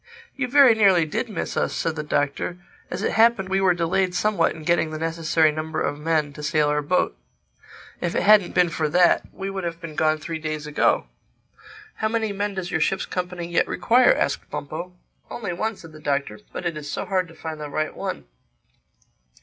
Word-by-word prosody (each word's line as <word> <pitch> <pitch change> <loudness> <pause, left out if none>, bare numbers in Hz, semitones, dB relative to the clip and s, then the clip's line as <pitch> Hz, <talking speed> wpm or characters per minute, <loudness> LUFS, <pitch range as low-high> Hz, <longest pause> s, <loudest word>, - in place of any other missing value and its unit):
"You 275 -3 -1
very 270 -1 +7
nearly 195 -6 +4
did 190 +10 -3
miss 205 - -4
us," - - 0
said 160 - -1
the 155 - -3
Doctor. 150 +3 -1 0.3
"As - - -4
it - - +1
happened, 225 -4 +3
we 195 0 +1
were 185 -2 +4
delayed 180 +2 0
somewhat 195 -1 +1
in 160 - -10
getting 170 0 +2
the 155 - -5
necessary 165 -1 +2
number 155 +1 -4
of 145 - -2
men 155 -2 0
to 150 - -9
sail 150 0 +1
our 150 0 +1
boat. 150 - 0 0.9
If 175 - -2
it - - +1
hadn't 205 -3 +5
been 180 -1 +4
for 155 -1 -1
that, 175 +2 +4
we 195 0 -5
would 195 -1 -4
have 170 -1 -4
been 165 -3 -8
gone 155 0 +2
three 160 +1 -5
days 155 -1 -4
ago." 150 - +2 0.9
"How 220 - 0
many 220 -2 -1
men 205 0 -2
does 180 -2 -4
your 160 - 0
ship's 190 +5 +1
company 180 -1 -4
yet 170 - +1
require?" 250 - +4
asked - - -1
Bumpo. 165 +5 -6 0.4
"Only 210 -7 -4
one," 220 +5 -2
said 165 -4 -13
the 155 - -13
Doctor—"But 140 0 -3
it 170 -2 -1
is 145 -1 -7
so - - -3
hard 185 -2 0
to 165 - -15
find 160 -1 -7
the 150 - -5
right 155 +2 -2
one." - - -5
170 Hz, 205 wpm, -23 LUFS, 155-190 Hz, 0.9 s, very